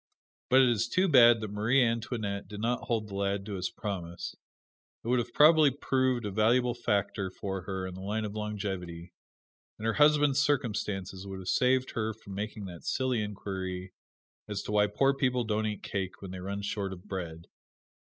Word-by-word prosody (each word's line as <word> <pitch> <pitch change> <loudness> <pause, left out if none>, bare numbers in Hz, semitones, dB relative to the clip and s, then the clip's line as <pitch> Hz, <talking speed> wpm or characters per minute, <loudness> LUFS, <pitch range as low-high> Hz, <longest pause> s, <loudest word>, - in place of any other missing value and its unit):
But 130 +1 +7
it 125 - +4
is 115 -1 +1
too 185 +10 +2
bad 120 -7 +7
that 110 -2 -4
Marie 115 +6 +3
Antoinette 115 -3 -2
did 105 - -8
not 120 +2 -1
hold 110 -3 -1
the 100 - -10
lad 100 0 -1
to 105 - -5
his 90 -1 -2
promise. 85 -4 -5 0.7
It 115 - -4
would 125 0 +3
have 120 0 -3
probably 155 +1 +7
proved 130 -3 0
a 105 - -2
valuable 120 +4 +3
factor 100 -4 -1
for 95 0 -5
her 95 -1 -3
in 95 - -6
the 95 - -8
line 105 +3 -2
of 105 - -5
longevity; 95 -5 -5 0.6
and 110 - -6
her 115 - +2
husband's 150 -1 +4
circumstances 105 -9 -1
would 95 -1 -6
have 95 -1 -6
saved 130 0 +2
her 110 -1 -2
from 105 -3 -11
making 105 +1 -4
that 90 -3 -9
silly 130 -4 0
inquiry 95 -3 -5 0.5
as 105 -1 -3
to - - -5
why 105 0 +4
poor 135 +7 +2
people 125 -2 +1
don't 110 -1 0
eat 105 -2 -4
cake 95 -2 -4
when 95 -2 -8
they 95 - -6
run 100 +2 -4
short 100 -1 -2
of 90 -1 -11
bread. 85 -5 -6
105 Hz, 190 wpm, -30 LUFS, 95-120 Hz, 0.7 s, But